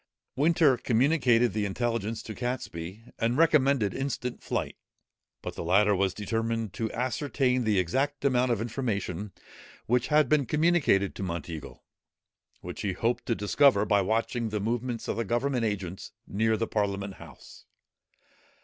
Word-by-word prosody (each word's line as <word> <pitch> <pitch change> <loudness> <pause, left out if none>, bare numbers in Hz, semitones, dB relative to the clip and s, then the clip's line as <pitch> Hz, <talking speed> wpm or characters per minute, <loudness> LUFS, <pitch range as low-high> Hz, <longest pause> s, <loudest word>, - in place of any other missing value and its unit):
Winter 150 -2 +4
communicated 125 - +3
the 105 0 -1
intelligence 115 +1 -2
to 110 - -7
Catesby, 105 -6 -5 0.2
and 115 +2 +1
recommended 140 - +3
instant 130 -2 -3
flight; - - -3 0.7
but - - -5
the - - -6
latter 100 +4 +4
was 95 -1 0
determined 115 0 -2
to 110 -1 -3
ascertain 130 0 0
the 105 -2 +2
exact 135 - 0
amount 125 -2 +3
of 115 -3 0
information 105 -5 -3 0.5
which 125 +1 +1
had 150 -2 +4
been 140 -1 +2
communicated 150 - +2
to - - -8
Monteagle, 85 -4 -6 0.8
which - - -7
he 100 -2 -1
hoped 115 +6 -1
to 115 - +1
discover 105 +1 +3
by 100 -1 +3
watching 115 +3 -1
the 105 0 -2
movements 120 +2 -2
of - - -2
the 115 - 0
government 120 +2 0
agents 95 -4 -4
near 110 +2 +1
the 115 - 0
Parliament 100 -2 -2
House. 75 -7 -14
115 Hz, 145 wpm, -28 LUFS, 100-130 Hz, 0.8 s, Winter